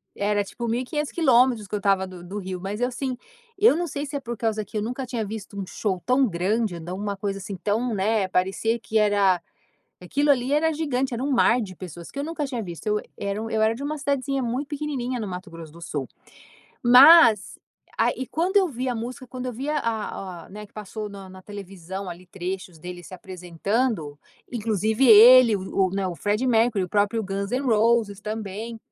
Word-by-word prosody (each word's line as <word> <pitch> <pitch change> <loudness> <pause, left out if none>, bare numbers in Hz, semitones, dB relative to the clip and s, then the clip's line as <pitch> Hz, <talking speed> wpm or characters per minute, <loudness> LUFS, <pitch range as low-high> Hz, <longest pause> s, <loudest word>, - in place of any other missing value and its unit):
era 205 0 +1
tipo 235 +4 -6
1.500 255 +6 -2
quilômetros 250 - +3
que - - -2
eu - - -1
estava 195 -2 +2
do 185 -1 -10
do 185 +4 -7
Rio, 185 -1 -5
mas 200 +4 -4
eu 245 - +3
assim. 255 0 -4 0.4
Eu 410 -5 +5
não 350 0 -1
sei 285 -1 -4
se 290 - -10
é - - 0
por 240 -3 -5
causa 215 -1 -1
que 215 - -6
eu - - 0
nunca 250 +4 -4
tinha 235 -3 -3
visto 205 -1 -7
um 195 - -3
show 190 -3 -2
tão 255 +1 +3
grande, 195 +2 -1
dá 175 +3 -6
uma 200 +1 -3
coisa 195 0 -3
assim 195 +1 -6
tão, 220 +6 -1
né 205 0 +1
parecia 190 +5 0
que 220 -1 -2
era 200 -4 +3 0.6
aquilo 285 +11 +2
ali 260 0 +1
era 320 +2 +3
gigante, 270 -4 -1
era 235 - -3
um 285 - -1
mar 245 -1 +4
de 190 -4 -6
pessoas 175 -1 -9
que - - -12
eu - - -1
nunca 315 -1 -3
tinha 250 -5 -4
visto. 175 +1 -8
Eu 210 0 +1 0.2
era 200 0 -3
eu 220 0 -2
era 220 +1 +3
de 265 - -7
uma 305 +2 -3
cidadezinha 275 -1 -1
muito 250 +4 -3
pequenininha 275 -4 -3
no 215 - -3
Mato 180 0 -7
Grosso 165 -2 -10
do 170 - -13
Sul. 145 -5 -4 0.8
Mas 250 - +7 0.4
a - - +3
e 260 - -5
quando 360 +5 +1
eu 385 -2 +4
vi 255 -3 -3
a - - 0
música, 245 +3 -6
quando 255 +1 -6
eu 250 - -4
vi 265 +6 -4
a 305 - 0
a 200 -6 -4
a, - - -18
né, 210 +2 -9
que - - -36
passou 215 0 -6
na 195 -2 -10
na 185 0 -12
televisão 195 -1 -7
ali 175 +1 -9
trechos 185 -1 -6
dele 180 +2 -8
se - - -12
apresentando, 180 - -2 0.3
inclusive 220 +1 +1
ele, 235 +1 +9
o 190 0 0
o, - - -7
né, 195 0 -1
o 180 - -3
Freddie 210 +7 0
Mercury, 225 -4 +3
o - - -15
próprio 210 +3 +1
Guns 195 0 -3
N’ 255 +2 0
Roses 225 -3 +2
também. 215 +1 -5
215 Hz, 220 wpm, -24 LUFS, 195-250 Hz, 0.8 s, ele